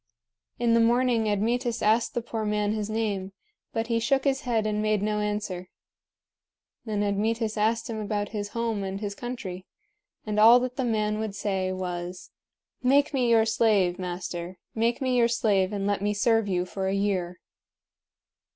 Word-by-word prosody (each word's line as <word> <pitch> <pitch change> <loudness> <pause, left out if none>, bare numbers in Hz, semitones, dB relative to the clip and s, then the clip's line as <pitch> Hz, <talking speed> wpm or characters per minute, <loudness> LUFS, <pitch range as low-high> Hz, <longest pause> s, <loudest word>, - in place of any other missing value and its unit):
In 235 -1 +2
the 230 - +5
morning 235 -1 +3
Admetus 235 +4 0
asked 220 +2 +2
the 240 - -1
poor 225 -2 -4
man 210 0 0
his 215 -1 -3
name, 205 -3 -2 0.4
but 225 -1 -1
he 230 0 0
shook 270 +3 +1
his 270 -1 +1
head 230 -5 0
and 210 0 0
made 215 -1 +1
no 210 0 0
answer. 205 -3 -3 1.2
Then 210 -2 -1
Admetus 215 +2 0
asked 225 +2 +1
him 225 -3 -4
about 205 -1 -2
his 205 -2 -4
home 225 -3 -1
and 195 0 -4
his 205 -1 -4
country; 200 -6 -6 0.6
and 210 -1 -1
all 230 +3 +8
that 250 0 -3
the 265 -2 -1
man 215 -2 0
would 215 -2 -3
say 190 -2 -1
was: 180 -1 -5 0.5
"Make 280 +4 +3
me 250 -3 +2
your 225 -1 +5
slave, 210 -6 +2
master! 180 0 -5 0.2
Make 230 +4 0
me 255 -1 +1
your 235 -1 +4
slave, 210 -5 +1
and 200 -1 -2
let 200 -1 0
me 205 +1 0
serve 225 0 +2
you 180 -2 0
for 190 +1 -3
a 190 - 0
year." 185 -3 -1
215 Hz, 175 wpm, -26 LUFS, 200-230 Hz, 1.2 s, all